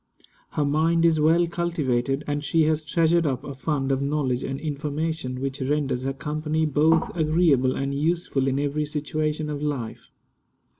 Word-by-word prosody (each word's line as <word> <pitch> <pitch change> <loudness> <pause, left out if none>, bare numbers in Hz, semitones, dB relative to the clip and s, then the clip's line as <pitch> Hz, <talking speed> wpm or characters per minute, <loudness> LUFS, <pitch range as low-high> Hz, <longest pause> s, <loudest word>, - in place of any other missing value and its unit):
Her 150 - +1
mind 165 +3 +2
is 160 -2 +4
well 165 +3 +4
cultivated, 145 -6 -1
and 145 0 -2
she 160 +1 +2
has 155 0 +1
treasured 165 +1 +2
up 130 -3 -2
a 140 - -6
fund 135 0 -1
of 135 0 0
knowledge 140 -3 0
and 135 0 -4
information 150 -2 -3
which 135 +1 -4
renders 135 -2 -1
her 135 - -1
company 155 +2 -2
both 155 +3 +2
agreeable 155 -5 +3
and 140 0 -2
useful 150 -2 0
in 135 0 +1
every 145 +1 -1
situation 150 +1 -2
of 145 -1 -4
life. 140 -7 -4
150 Hz, 160 wpm, -24 LUFS, 135-160 Hz, -, is